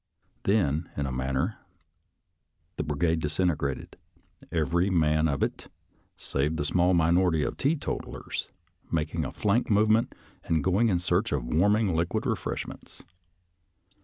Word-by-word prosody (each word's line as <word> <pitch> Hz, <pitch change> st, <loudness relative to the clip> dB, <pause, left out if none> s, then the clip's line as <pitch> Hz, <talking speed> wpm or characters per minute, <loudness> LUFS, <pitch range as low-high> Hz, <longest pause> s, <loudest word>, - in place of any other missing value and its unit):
Then, 85 Hz, -6 st, +1 dB
in 70 Hz, -, 0 dB
a 65 Hz, -, -3 dB
man 65 Hz, +1 st, -2 dB
ner, 65 Hz, -, -1 dB, 1.2 s
the -, -, -1 dB
brigade 80 Hz, +3 st, 0 dB
disintegrated, 75 Hz, -3 st, -1 dB, 0.5 s
every 85 Hz, +3 st, +1 dB
man 80 Hz, -3 st, +3 dB
of 70 Hz, -3 st, 0 dB
it, -, -, -3 dB, 0.5 s
save 70 Hz, +4 st, -1 dB
the 75 Hz, -, -2 dB
small 90 Hz, +3 st, +3 dB
minority 85 Hz, -1 st, +3 dB
of -, -, -2 dB
teetotallers, 145 Hz, +2 st, -2 dB, 0.4 s
making 80 Hz, 0 st, -1 dB
a -, -, -4 dB
flank 105 Hz, +4 st, +1 dB
movement, 110 Hz, +2 st, +3 dB, 0.3 s
and 80 Hz, -2 st, 0 dB
going 100 Hz, +6 st, +3 dB
in 90 Hz, -, +2 dB
search 90 Hz, +5 st, 0 dB
of 70 Hz, -5 st, -1 dB
warm 90 Hz, +11 st, +3 dB
ing 105 Hz, -6 st, +1 dB
liquid 85 Hz, +1 st, -1 dB
refreshments. -, -, -4 dB
85 Hz, 135 wpm, -27 LUFS, 75-95 Hz, 1.2 s, man